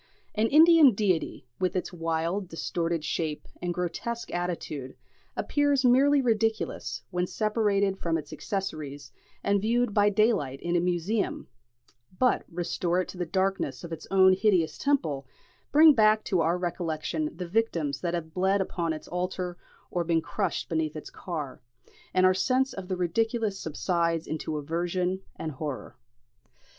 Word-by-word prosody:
An 220 +1 +2
Indian 310 -3 +7
deity, 185 -9 0
with 185 -1 0
its 185 - -2
wild 165 +3 -1
distorted 165 -1 -2
shape 155 -2 -2
and 175 0 -1
grotesque 180 +7 -4
attitude, 165 -6 -4 0.4
appears 285 -2 +2
merely 275 +3 +5
ridiculous 225 -2 -1
when 180 0 0
separated 205 -3 +1
from 165 -1 0
its 150 -2 -7
accessories 155 -9 -5 0.3
and 200 0 +2
viewed 235 +1 +1
by 205 0 +4
daylight 200 - +1
in 175 0 -1
a - - +4
museum; 180 +5 -1 0.7
but 250 +4 +2
restore 175 +1 -1
it - - -5
to - - -8
the 175 - -2
darkness 190 -7 -1
of 170 -1 -6
its 160 - -8
own 190 -1 +6
hideous 185 -5 +2
temple, 155 - 0 0.4
bring 310 +1 +8
back 215 -2 +4
to 185 -4 +1
our 165 +2 +2
recollection 165 -3 -2
the 180 -1 -4
victims 170 -9 0
that 175 0 -1
have 160 -2 -5
bled 190 +2 +2
upon 170 -3 -1
its 155 - -8
altar 180 0 -3 0.4
or 175 - 0
been 165 -1 +2
crushed 185 +3 -2
beneath 160 -2 -1
its 155 - -8
car, 150 -8 -6 0.5
and 185 0 +3
our 185 - +6
sense 255 +7 +1
of 190 -2 -7
the 185 -1 -2
ridiculous 215 +3 0
subsides 170 +1 -1
into 155 0 -3
aversion 175 +5 -1
and 160 - -4
horror. 145 -1 -6
180 Hz, 150 wpm, -28 LUFS, 165-210 Hz, 0.7 s, bring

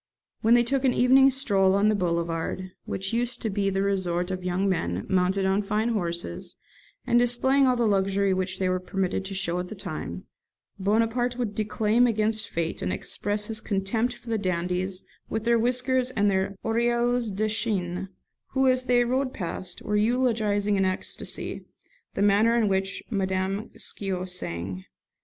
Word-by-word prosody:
When 225 +2 +5
they 240 - +5
took 270 +3 0
an 260 -2 +3
evening 265 +2 +6
stroll 200 -8 +2
on 200 +1 +3
the 215 - +4
Boulevard, 170 0 -2
which 190 +3 -3
used 240 +1 -1
to 220 - -1
be 195 0 0
the 195 0 0
resort 180 -2 0
of 185 -1 -4
young 180 +2 0
men, 90 - -1
mounted 190 +1 +1
on 190 +2 +2
fine 210 +3 0
horses, 170 - -3 0.5
and 240 - +4
displaying 265 +3 +3
all 255 - +3
the 240 -1 +1
luxury 195 -1 +2
which 185 0 -2
they 190 - 0
were 185 0 +1
permitted 190 +1 -2
to 195 0 -6
show 180 -2 0
at 180 - -4
that 215 - -8
time, - - -6 0.6
Bonaparte 230 +5 +1
would 235 -5 -2
declaim 215 +3 +2
against 220 -1 +1
fate, 165 -1 -2
and 90 - -1
express 205 - -2
his 220 0 -2
contempt 220 +5 -1
for 235 - -9
the 220 - +1
dandies 185 0 -2 0.3
with 220 0 -2
their 235 0 +3
whiskers 250 +2 +1
and 205 -5 +1
their 190 +1 0
'orielles 235 +1 +1
de 210 +2 -1
chiene', 195 -4 -1 0.4
who, 265 0 +3
as 255 0 +2
they 245 -1 +4
rode 255 +2 -1
past, 180 -1 -5
were 210 - -1
eulogising 215 -3 +1
in 195 - +2
ecstasy 185 0 -2 0.5
the 200 - +1
manner 210 +3 +4
in 225 -3 +3
which 195 0 -1
Madame 195 +1 -1
Scio 190 -2 -3
sang. 95 - -4
205 Hz, 170 wpm, -26 LUFS, 185-235 Hz, 0.6 s, evening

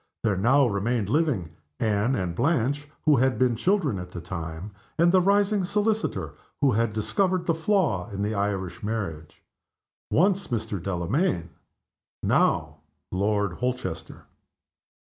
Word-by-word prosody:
There 105 -3 +2
now 130 +9 +4
remained 105 0 0
living 130 - +1 0.3
Anne 110 +3 +1
and 90 -5 -2
Blanche, 145 - 0 0.2
who 150 -3 +5
had 130 +1 +2
been 125 -2 +2
children 155 - +1
at 90 0 -7
the 90 - -7
time; 85 +2 -6 0.3
and 170 +1 +5
the 185 0 +5
rising 200 +1 +3
solicitor 210 +3 -1 0.3
who 140 -3 +4
had 115 0 +1
discovered 180 - 0
the 165 - +2
flaw 160 - +1
in 100 0 -3
the 105 +2 -1
Irish 100 -1 -2
marriage 95 -8 -5 0.7
once 195 +3 +2
Mr. 105 -5 -3
Delamayn: 90 - -1 0.7
now - - +2 0.3
Lord 100 0 0
Holchester. 125 -7 -4
115 Hz, 130 wpm, -26 LUFS, 100-160 Hz, 0.7 s, who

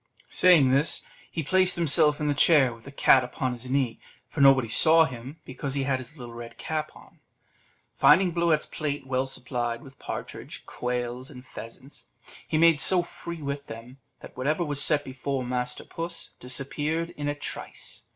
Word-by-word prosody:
Saying 165 -8 +5
this, 140 +4 +1 0.2
he 165 - -4
placed 185 +4 +3
himself 150 -2 +4
in 150 - -1
the 145 - +2
chair 145 -4 +4
with 115 -1 -17
the 140 - -10
cat 135 -2 +4
upon 125 +1 -3
his 125 +1 -9
knee, 130 -4 -1 0.3
for 150 - -4
nobody 135 -3 +6
saw 160 +8 +5
him, 130 +3 -9
because 135 +1 -5
he 140 - 0
had 135 -1 0
his 130 +5 -11
little 120 -3 -9
red 115 0 -10
cap 155 -1 -4
on; - - -18 0.8
finding 185 -1 +5
Bluet's 170 -2 +1
plate 145 -3 -4
well 130 0 -1
supplied 120 -2 -4
with 135 -1 -15
partridge, - - -8
quails, 125 +1 -4
and 125 -2 -12
pheasants, 130 +4 -12 0.4
he 155 - 0
made 165 -2 +5
so 180 +2 +6
free 170 -2 -9
with 140 0 -5
them, 115 +4 -11 0.2
that - - -12
whatever 150 +7 -1
was 145 -2 +1
set 150 -1 +4
before 130 0 -4
master 125 0 -3
puss 170 +1 -6
disappeared 145 +6 -2
in 145 -4 -6
a 145 - -1
trice. 145 - -7
140 Hz, 175 wpm, -26 LUFS, 125-155 Hz, 0.8 s, nobody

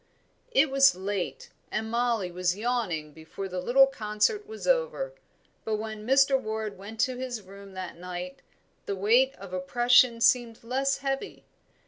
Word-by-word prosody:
It 275 +1 +4
was 275 0 +6
late, 190 0 -4 0.2
and 220 +1 -3
Mollie 235 -6 0
was 180 +1 -1
yawning 210 -10 -2
before 160 +5 -7
the 180 -1 -4
little 265 +8 +6
concert 270 - -1
was 440 0 -8
over; - - 0 0.5
but 220 - -1
when 215 0 -6
Mr. 270 0 +4
Ward 220 -2 -4
went 205 +4 -10
to 255 -1 0
his 250 -4 -5
room 195 +1 -13
that 185 -2 -7
night 180 0 -6 0.5
the 200 - -1
weight 240 +8 +3
of 195 -2 -11
oppression 240 +6 +4
seemed 235 -1 +2
less 270 +3 0
heavy. 270 +9 -3
220 Hz, 150 wpm, -27 LUFS, 195-265 Hz, 0.5 s, was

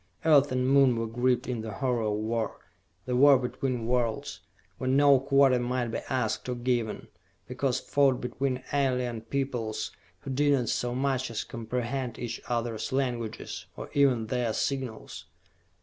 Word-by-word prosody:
Earth 145 -3 +5
and 130 0 +1
Moon 135 -2 +5
were 115 - -1
gripped 125 +2 +1
in 120 -3 -2
the 110 -1 -6
horror 125 +1 0
of 105 - 0
war, 110 +1 -2 0.5
the 125 - -1
war 140 +2 +7
between 125 -1 -2
worlds, 125 +4 -1 0.4
where 130 - -1
no 140 0 +6
quarter 135 -1 +4
might 120 0 -1
be - - -2
asked 130 0 -1
or 125 - -1
given, 120 -2 -1 0.4
because 130 0 -1
fought 140 -3 +2
between 130 +1 -2
alien 125 -4 0
peoples 115 -3 -3 0.3
who 135 - -6
did 145 +2 +3
not 125 -5 +1
so 120 0 -1
much 130 -1 0
as 115 - -3
comprehend 120 +1 -4
each 115 -2 -5
other's 115 0 -2
languages, 120 -4 -3
or - - -7
even 130 -5 +3
their 120 -1 -1
signals. 130 -4 -3
125 Hz, 155 wpm, -28 LUFS, 115-135 Hz, 0.5 s, war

